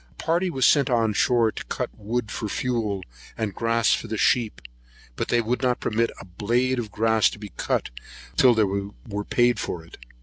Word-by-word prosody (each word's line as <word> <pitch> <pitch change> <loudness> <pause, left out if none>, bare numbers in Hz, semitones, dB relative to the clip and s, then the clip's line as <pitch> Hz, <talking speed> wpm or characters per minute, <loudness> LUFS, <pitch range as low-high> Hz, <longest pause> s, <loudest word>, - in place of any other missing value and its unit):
A - - -28
party 175 +3 +1
was 130 -6 +1
sent 140 -2 +4
on 115 -3 +2
shore 115 +1 +3
to - - -7
cut - - -3
wood 110 +1 -3
for 110 - -4
fuel, 110 -5 -1 0.3
and 105 -3 -2
grass 115 0 +2
for - - -2
the 110 - -3
sheep; 115 0 +2 0.6
but - - -2
they 120 - +2
would 120 +4 -1
not 125 -2 +1
permit 115 +1 0
a - - -10
blade 120 +8 0
of 115 -3 -4
grass 110 0 +3
to - - -9
be 105 -3 -10
cut - - -1 0.4
till 125 -2 +6
they 110 - +4
were 100 +1 -4
paid 120 0 +2
for 85 -2 -4
it. 85 - -14
115 Hz, 200 wpm, -24 LUFS, 105-125 Hz, 0.6 s, till